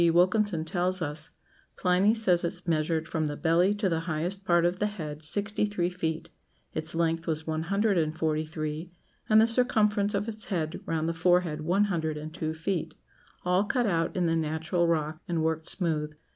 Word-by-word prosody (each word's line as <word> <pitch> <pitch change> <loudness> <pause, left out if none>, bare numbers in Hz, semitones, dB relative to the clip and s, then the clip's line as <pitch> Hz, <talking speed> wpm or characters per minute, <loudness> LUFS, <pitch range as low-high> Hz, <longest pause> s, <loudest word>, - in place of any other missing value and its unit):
Wilkinson 180 0 +2
tells 180 +2 0
us, 155 -1 -1 0.5
'Pliny 190 +4 +3
says 185 -6 +4
it 175 +1 -3
measured 160 0 0
from 155 -2 -1
the 145 0 -4
belly 175 +5 +3
to 205 -1 0
the 165 -3 0
highest 175 +5 -2
part 175 -2 +3
of 175 +2 0
the 210 - +2
head 155 -8 -6
sixty 205 +6 +1
three 180 -4 -1
feet; 165 -2 -3 0.4
its 155 +1 -2
length 165 0 0
was 160 -1 -1
one 160 0 -2
hundred 200 -1 +2
and 155 0 -1
forty 155 -1 0
three; 155 +1 -5 0.4
and 215 0 +7
the 220 - +7
circumference 210 -4 +2
of 200 +2 -1
its 215 -1 -5
head 165 -3 -2
round 160 -1 -1
the 165 - 0
forehead 170 -2 +2
one 180 +6 +2
hundred 160 -6 -1
and 155 +1 -7
two 155 -1 -3
feet; 160 -1 -3 0.5
all 180 +2 +3
cut 245 +3 0
out 165 -5 0
in 180 - +2
the 165 0 +2
natural 160 +2 0
rock, 155 -1 -1
and 170 -2 0
worked 160 0 -1
smooth.' 155 -5 0
170 Hz, 190 wpm, -28 LUFS, 160-195 Hz, 0.5 s, and